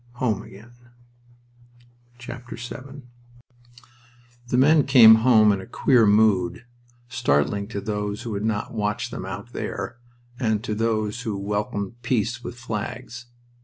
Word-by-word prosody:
Home 115 Hz, -5 st, -1 dB
again! 110 Hz, +3 st, -14 dB, 1.5 s
VII 120 Hz, +3 st, -9 dB, 1.5 s
The 125 Hz, -, 0 dB
men 150 Hz, +3 st, +5 dB
came 120 Hz, -5 st, +9 dB
home 110 Hz, -3 st, +5 dB
in 100 Hz, -1 st, -1 dB
a -, -, -11 dB
queer 120 Hz, -5 st, +3 dB
mood, 100 Hz, -2 st, +2 dB, 0.4 s
startling 100 Hz, -, 0 dB
to 105 Hz, -2 st, -5 dB
those 105 Hz, 0 st, -4 dB
who 115 Hz, -, -5 dB
had 100 Hz, +1 st, -3 dB
not 110 Hz, 0 st, -2 dB
watched 105 Hz, -2 st, -2 dB
them -, -, -6 dB
"out -, -, -8 dB
there," 120 Hz, -, -5 dB, 0.4 s
and 110 Hz, -4 st, 0 dB
to 110 Hz, -, -3 dB
those 110 Hz, +1 st, -1 dB
who 110 Hz, -5 st, -3 dB
welcomed 105 Hz, +2 st, -3 dB
peace 120 Hz, 0 st, -1 dB
with 120 Hz, -, -7 dB
flags. 120 Hz, +1 st, -6 dB
110 Hz, 130 wpm, -23 LUFS, 105-120 Hz, 1.5 s, came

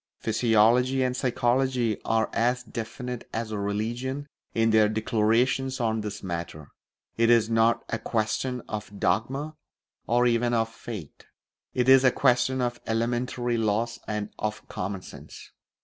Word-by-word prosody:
Physiology 120 Hz, +4 st, +3 dB
and 125 Hz, 0 st, 0 dB
psychology 125 Hz, -2 st, +1 dB
are 110 Hz, -1 st, +1 dB
as 125 Hz, +2 st, +1 dB
definite 120 Hz, +2 st, -6 dB
as 110 Hz, -1 st, -3 dB
religion 115 Hz, +7 st, -3 dB, 0.3 s
in 115 Hz, 0 st, +3 dB
their 110 Hz, -1 st, +5 dB
declarations 115 Hz, +4 st, +1 dB
on 110 Hz, -2 st, 0 dB
this 105 Hz, -1 st, -6 dB
matter; 85 Hz, -4 st, -5 dB, 0.5 s
it 115 Hz, 0 st, +3 dB
is 115 Hz, -1 st, +4 dB
not 115 Hz, +1 st, +3 dB
a 115 Hz, -, -3 dB
question 115 Hz, +3 st, -1 dB
of 105 Hz, -1 st, -6 dB
dogma 135 Hz, -, -1 dB, 0.5 s
or 120 Hz, +1 st, +3 dB
even 120 Hz, 0 st, +2 dB
of 115 Hz, -1 st, +1 dB
faith; 105 Hz, -11 st, -9 dB, 0.5 s
it 125 Hz, 0 st, +1 dB
is 130 Hz, 0 st, +7 dB
a 130 Hz, -, +7 dB
question 130 Hz, 0 st, +2 dB
of 120 Hz, -1 st, -2 dB
elementary 120 Hz, +1 st, -1 dB
laws 115 Hz, +2 st, 0 dB
and 105 Hz, -1 st, -3 dB
of 105 Hz, 0 st, -3 dB
common 95 Hz, 0 st, -4 dB
sense. -, -, -12 dB
115 Hz, 135 wpm, -26 LUFS, 110-125 Hz, 0.5 s, is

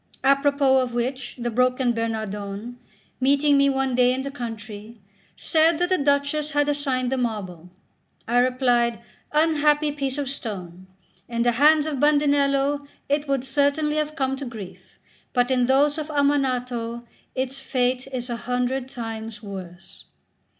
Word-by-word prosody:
Apropos 275 Hz, -1 st, +4 dB
of 250 Hz, -2 st, -2 dB
which, 250 Hz, +1 st, -3 dB
the 240 Hz, -1 st, -3 dB
broken 250 Hz, +1 st, +2 dB
Bernardone, 220 Hz, 0 st, -4 dB, 0.4 s
meeting 280 Hz, +2 st, +3 dB
me 280 Hz, 0 st, +4 dB
one 265 Hz, -1 st, 0 dB
day 250 Hz, 0 st, +4 dB
in 265 Hz, -, -3 dB
the 275 Hz, -, -5 dB
country, 225 Hz, -3 st, -8 dB, 0.4 s
said 320 Hz, 0 st, +2 dB
that 355 Hz, +1 st, 0 dB
the 370 Hz, -, +3 dB
Duchess 285 Hz, +1 st, +1 dB
had 290 Hz, 0 st, +2 dB
assigned 270 Hz, -4 st, 0 dB
the 265 Hz, -, 0 dB
marble. 190 Hz, -8 st, -4 dB, 0.6 s
I 240 Hz, +2 st, +3 dB
replied: 245 Hz, -2 st, +2 dB, 0.3 s
"Unhappy 300 Hz, -1 st, +3 dB
piece 275 Hz, -2 st, -3 dB
of 285 Hz, -2 st, -2 dB
stone! 185 Hz, -8 st, -6 dB, 0.4 s
In 235 Hz, 0 st, 0 dB
the 240 Hz, -, +3 dB
hands 300 Hz, +5 st, +4 dB
of 300 Hz, -4 st, -3 dB
Bandinello 285 Hz, -1 st, +2 dB, 0.2 s
it 290 Hz, +1 st, 0 dB
would 275 Hz, -2 st, 0 dB
certainly 290 Hz, +2 st, +1 dB
have 305 Hz, 0 st, -1 dB
come 270 Hz, -3 st, 0 dB
to 280 Hz, -, -6 dB
grief; 220 Hz, -6 st, -10 dB, 0.4 s
but 245 Hz, 0 st, +2 dB
in 250 Hz, -2 st, +2 dB
those 285 Hz, +3 st, +3 dB
of 305 Hz, -, -4 dB
Ammanato 250 Hz, -5 st, 0 dB, 0.3 s
its 265 Hz, +1 st, -2 dB
fate 255 Hz, -1 st, -1 dB
is 250 Hz, -2 st, -4 dB
a 240 Hz, -2 st, -3 dB
hundred 250 Hz, +2 st, -2 dB
times 225 Hz, -3 st, -6 dB
worse." 190 Hz, -3 st, -10 dB
260 Hz, 150 wpm, -24 LUFS, 235-285 Hz, 0.6 s, Apropos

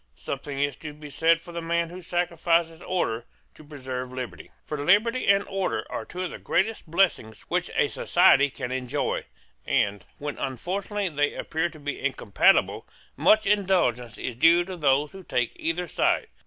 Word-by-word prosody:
Something 135 Hz, -, -5 dB
is 145 Hz, -1 st, 0 dB
to 150 Hz, -2 st, -8 dB
be 150 Hz, -1 st, -11 dB
said 165 Hz, +2 st, +3 dB
for 175 Hz, -, -11 dB
the 170 Hz, 0 st, -4 dB
man 170 Hz, 0 st, -1 dB
who 180 Hz, +1 st, -8 dB
sacrifices 170 Hz, -1 st, 0 dB
order 120 Hz, -11 st, -2 dB, 0.3 s
to -, -, -15 dB
preserve 130 Hz, -4 st, -6 dB
liberty. 130 Hz, -1 st, -7 dB, 0.2 s
For 150 Hz, -2 st, -4 dB
liberty 220 Hz, -, +3 dB
and 200 Hz, 0 st, +5 dB
order 195 Hz, -1 st, -2 dB
are -, -, -4 dB
two 180 Hz, +1 st, -5 dB
of 180 Hz, -, -3 dB
the -, -, -8 dB
greatest 195 Hz, -2 st, -1 dB
blessings 165 Hz, -, +1 dB
which -, -, 0 dB
a -, -, +3 dB
society 140 Hz, +1 st, +4 dB
can 125 Hz, -2 st, -6 dB
enjoy: 130 Hz, -1 st, -2 dB, 0.4 s
and, 100 Hz, -2 st, 0 dB
when 145 Hz, 0 st, -5 dB
unfortunately 190 Hz, -, -3 dB
they 145 Hz, -2 st, 0 dB
appear 160 Hz, +2 st, -1 dB
to 155 Hz, -, -14 dB
be 145 Hz, -1 st, -4 dB
incompatible, 130 Hz, -7 st, +2 dB, 0.3 s
much 215 Hz, -, +4 dB
indulgence 180 Hz, -, +1 dB
is 125 Hz, -, -4 dB
due 165 Hz, +8 st, +5 dB
to 190 Hz, 0 st, -6 dB
those 145 Hz, -2 st, +2 dB
who 195 Hz, -, -10 dB
take 125 Hz, -7 st, -1 dB
either 170 Hz, +2 st, -2 dB
side. -, -, +1 dB
160 Hz, 170 wpm, -26 LUFS, 135-180 Hz, 0.4 s, and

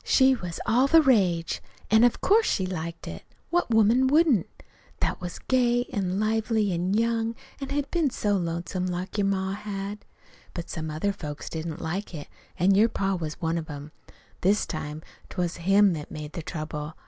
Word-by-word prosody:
She 265 Hz, 0 st, +5 dB
was 180 Hz, -9 st, -5 dB
all 245 Hz, +4 st, +4 dB
the 325 Hz, +3 st, +7 dB
rage; 190 Hz, -, +2 dB, 0.3 s
an' 220 Hz, +1 st, +6 dB
of 245 Hz, -, +3 dB
course 440 Hz, +3 st, +4 dB
she 190 Hz, -, +1 dB
liked 170 Hz, -2 st, -5 dB
it. -, -, -6 dB, 0.3 s
What 350 Hz, -5 st, +1 dB
woman 225 Hz, +4 st, +5 dB
wouldn't, 290 Hz, -, +4 dB, 0.5 s
that -, -, -1 dB
was 175 Hz, -1 st, -5 dB
gay 245 Hz, -1 st, +2 dB
an' 190 Hz, -2 st, -1 dB
lively 220 Hz, -1 st, +1 dB
an' 180 Hz, +3 st, 0 dB
young, 230 Hz, 0 st, +1 dB, 0.2 s
an' 275 Hz, -, -5 dB
had 285 Hz, 0 st, -2 dB
been 335 Hz, -5 st, +2 dB
so 205 Hz, -4 st, 0 dB
lonesome 175 Hz, +1 st, -2 dB
like 180 Hz, +3 st, -3 dB
your 200 Hz, -, +2 dB
ma 190 Hz, -1 st, 0 dB
had? 200 Hz, 0 st, -5 dB, 0.5 s
But 170 Hz, -, -5 dB
some 160 Hz, -2 st, -4 dB
other 160 Hz, +7 st, -1 dB
folks 150 Hz, -5 st, -7 dB
didn't 160 Hz, 0 st, -5 dB
like 180 Hz, +3 st, -3 dB
it. 145 Hz, -, -8 dB, 0.3 s
An' 185 Hz, +4 st, +4 dB
your 215 Hz, +4 st, +5 dB
pa 195 Hz, -2 st, -1 dB
was 160 Hz, -4 st, -4 dB
one 165 Hz, 0 st, 0 dB
of 160 Hz, -, -7 dB
them. 145 Hz, 0 st, -8 dB, 0.5 s
This 200 Hz, +3 st, +3 dB
time 155 Hz, -1 st, -5 dB, 0.3 s
't -, -, -11 dB
was 175 Hz, -2 st, -1 dB
him 195 Hz, +3 st, +4 dB
that 150 Hz, -2 st, -6 dB
made 150 Hz, -1 st, -7 dB
the 170 Hz, -, -4 dB
trouble. 155 Hz, -2 st, -5 dB
195 Hz, 185 wpm, -26 LUFS, 170-225 Hz, 0.5 s, the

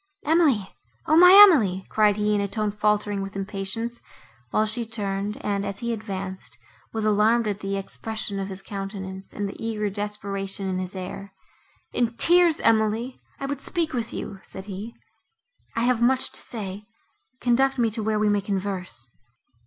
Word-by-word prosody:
"Emily, 295 Hz, -, +3 dB, 0.4 s
O! 310 Hz, -, +3 dB
my 360 Hz, +2 st, +9 dB
Emily!" 210 Hz, -, +4 dB
cried 210 Hz, -1 st, +3 dB
he 210 Hz, 0 st, +1 dB
in 205 Hz, -, +1 dB
a 200 Hz, -, -1 dB
tone 210 Hz, +1 st, -2 dB
faltering 210 Hz, -1 st, 0 dB
with 195 Hz, 0 st, -6 dB
impatience, 205 Hz, +4 st, -3 dB, 0.5 s
while 215 Hz, -, +2 dB
she 220 Hz, +2 st, -2 dB
turned, 205 Hz, -2 st, -3 dB
and, 200 Hz, -1 st, 0 dB
as 200 Hz, -1 st, -4 dB
he 235 Hz, +2 st, -2 dB
advanced, 190 Hz, -, -6 dB, 0.3 s
was 220 Hz, -1 st, -2 dB
alarmed 215 Hz, +2 st, +3 dB
at 205 Hz, -1 st, -2 dB
the 195 Hz, 0 st, -3 dB
expression 205 Hz, +1 st, -4 dB
of 195 Hz, -, -3 dB
his 195 Hz, -1 st, -8 dB
countenance 195 Hz, -1 st, -6 dB
and 205 Hz, -1 st, -3 dB
the 195 Hz, -, -7 dB
eager 210 Hz, -2 st, -2 dB
desperation 200 Hz, -1 st, -4 dB
of 185 Hz, -, -2 dB
his 185 Hz, +1 st, -5 dB
air. 195 Hz, +1 st, -7 dB, 0.6 s
"In 235 Hz, -1 st, 0 dB
tears, 345 Hz, +3 st, +5 dB
Emily! 225 Hz, +3 st, +1 dB, 0.2 s
I -, -, -3 dB
would 275 Hz, 0 st, -4 dB
speak 335 Hz, -2 st, -2 dB
with 235 Hz, -3 st, -2 dB
you," 195 Hz, -, -6 dB
said 190 Hz, 0 st, -10 dB
he, 205 Hz, +3 st, -7 dB, 0.8 s
"I 230 Hz, -, 0 dB
have 245 Hz, -1 st, +2 dB
much 260 Hz, +2 st, +3 dB
to -, -, 0 dB
say; 205 Hz, -2 st, -6 dB, 0.5 s
conduct 265 Hz, +3 st, +2 dB
me 230 Hz, -2 st, +2 dB
to 220 Hz, +1 st, -2 dB
where 215 Hz, 0 st, 0 dB
we 210 Hz, 0 st, +2 dB
may 205 Hz, -1 st, +2 dB
converse. 190 Hz, -, -3 dB
210 Hz, 170 wpm, -25 LUFS, 195-230 Hz, 0.8 s, my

